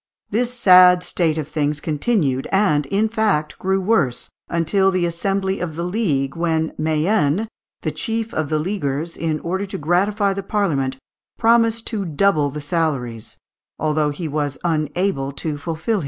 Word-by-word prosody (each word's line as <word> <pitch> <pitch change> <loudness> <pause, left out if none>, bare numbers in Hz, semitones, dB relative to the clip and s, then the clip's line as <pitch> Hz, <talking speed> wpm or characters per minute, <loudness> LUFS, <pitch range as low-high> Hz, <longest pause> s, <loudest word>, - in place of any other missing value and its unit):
This 240 +3 +1
sad 180 -6 +6
state 160 -4 0
of 155 -3 -3
things 150 -1 -1
continued, 150 - 0
and, 170 -8 +2
in 205 +8 +1
fact, 210 -9 0
grew 190 +1 +1
worse, 185 - 0 0.2
until 180 +4 +2
the 185 -2 +1
assembly 190 +3 -1
of 165 -4 -4
the 170 - -3
League, 170 -9 -1
when 160 -1 0
Mayenne, 160 +4 +1 0.4
the - - -1
chief 225 0 -3
of 155 -2 -2
the 155 - +1
leaguers, 160 -2 -2
in 160 -2 -2
order 190 +4 -2
to - - -5
gratify 195 +6 +1
the 195 - -4
Parliament, 155 -11 -1 0.4
promised 230 0 +3
to 215 -4 -2
double 160 -3 +2
the 150 +2 -6
salaries, 140 -8 -2 0.4
although 155 -1 +1
he 155 +3 -4
was 145 -1 -2
unable 155 -2 -1
to 150 +1 -4
fulfil 165 +3 -4
his 160 - -16
promise. 225 -3 +2
170 Hz, 160 wpm, -21 LUFS, 150-200 Hz, 0.4 s, sad